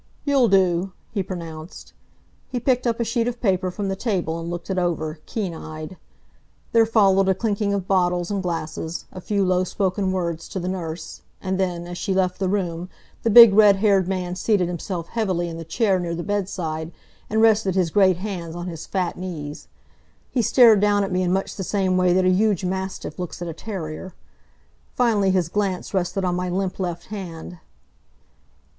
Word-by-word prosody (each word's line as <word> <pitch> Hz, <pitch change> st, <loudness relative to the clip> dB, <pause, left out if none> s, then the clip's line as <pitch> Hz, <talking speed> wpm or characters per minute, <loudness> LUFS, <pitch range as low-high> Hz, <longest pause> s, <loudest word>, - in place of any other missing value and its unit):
"You'll 275 Hz, -4 st, +4 dB
do," 190 Hz, -2 st, +2 dB, 0.2 s
he 205 Hz, -, -1 dB
pronounced. 165 Hz, -3 st, -8 dB, 0.6 s
He 250 Hz, -, -2 dB
picked 250 Hz, 0 st, +1 dB
up 230 Hz, 0 st, 0 dB
a -, -, +2 dB
sheet 230 Hz, +1 st, 0 dB
of 245 Hz, -1 st, -3 dB
paper 185 Hz, -4 st, +1 dB
from 200 Hz, +2 st, -4 dB
the 195 Hz, -, -1 dB
table 185 Hz, -7 st, -1 dB
and 165 Hz, 0 st, -5 dB
looked 175 Hz, +2 st, -5 dB
it 185 Hz, -, 0 dB
over, 160 Hz, -3 st, -2 dB
keen 200 Hz, -6 st, -3 dB
eyed. 155 Hz, +2 st, -8 dB, 0.8 s
There 225 Hz, -1 st, +4 dB
followed 195 Hz, -4 st, +4 dB
a 190 Hz, -, +3 dB
clinking 205 Hz, -2 st, -1 dB
of 195 Hz, -2 st, -2 dB
bottles 180 Hz, -1 st, +1 dB
and 200 Hz, -1 st, -1 dB
glasses, 165 Hz, -1 st, -4 dB
a 185 Hz, -, -8 dB
few 200 Hz, 0 st, 0 dB
low 185 Hz, 0 st, +2 dB
spoken 190 Hz, 0 st, -1 dB
words 170 Hz, -3 st, -3 dB
to 190 Hz, -, -4 dB
the 180 Hz, -, -4 dB
nurse, 170 Hz, -3 st, -5 dB, 0.2 s
and 190 Hz, 0 st, -2 dB
then, 175 Hz, -2 st, -1 dB
as 175 Hz, 0 st, -7 dB
she 190 Hz, -, -1 dB
left 185 Hz, -1 st, +1 dB
the 190 Hz, -2 st, 0 dB
room 180 Hz, -3 st, -2 dB, 0.3 s
the 230 Hz, -, +1 dB
big 230 Hz, -1 st, +10 dB
red 205 Hz, -1 st, +7 dB
haired 195 Hz, -2 st, +3 dB
man 180 Hz, -2 st, -2 dB
seated 190 Hz, -1 st, +1 dB
himself 175 Hz, 0 st, -4 dB
heavily 190 Hz, -7 st, -1 dB
in 165 Hz, -1 st, -6 dB
the 165 Hz, -, -6 dB
chair 190 Hz, +4 st, +1 dB
near 170 Hz, -1 st, -3 dB
the 170 Hz, -, -4 dB
bedside 175 Hz, -6 st, -3 dB, 0.4 s
and 220 Hz, -, +1 dB
rested 215 Hz, -4 st, +4 dB
his 180 Hz, -4 st, +1 dB
great 190 Hz, -2 st, +4 dB
hands 180 Hz, -4 st, -5 dB
on 175 Hz, 0 st, -5 dB
his 165 Hz, -3 st, -7 dB
fat 185 Hz, -3 st, -2 dB
knees. 155 Hz, -5 st, -6 dB, 0.6 s
He 250 Hz, -, +1 dB
stared 225 Hz, -1 st, +6 dB
down 205 Hz, 0 st, +3 dB
at 195 Hz, -, -3 dB
me 185 Hz, 0 st, +1 dB
in 180 Hz, -1 st, +1 dB
much 190 Hz, +1 st, -1 dB
the 195 Hz, -, -3 dB
same 190 Hz, -1 st, 0 dB
way 180 Hz, -1 st, +3 dB
that 185 Hz, +1 st, +3 dB
a -, -, +5 dB
huge 195 Hz, -1 st, +2 dB
mastiff 190 Hz, +1 st, -4 dB
looks 180 Hz, -2 st, -5 dB
at 175 Hz, -, -5 dB
a 165 Hz, -, -4 dB
terrier. 180 Hz, -2 st, -6 dB, 0.8 s
Finally 220 Hz, -6 st, +3 dB
his 185 Hz, -3 st, +2 dB
glance 195 Hz, 0 st, -2 dB
rested 190 Hz, 0 st, 0 dB
on 180 Hz, -, +1 dB
my 180 Hz, +1 st, -2 dB
limp 185 Hz, +1 st, -2 dB
left 175 Hz, -2 st, -3 dB
hand. 180 Hz, -3 st, -7 dB
185 Hz, 195 wpm, -23 LUFS, 175-200 Hz, 0.8 s, big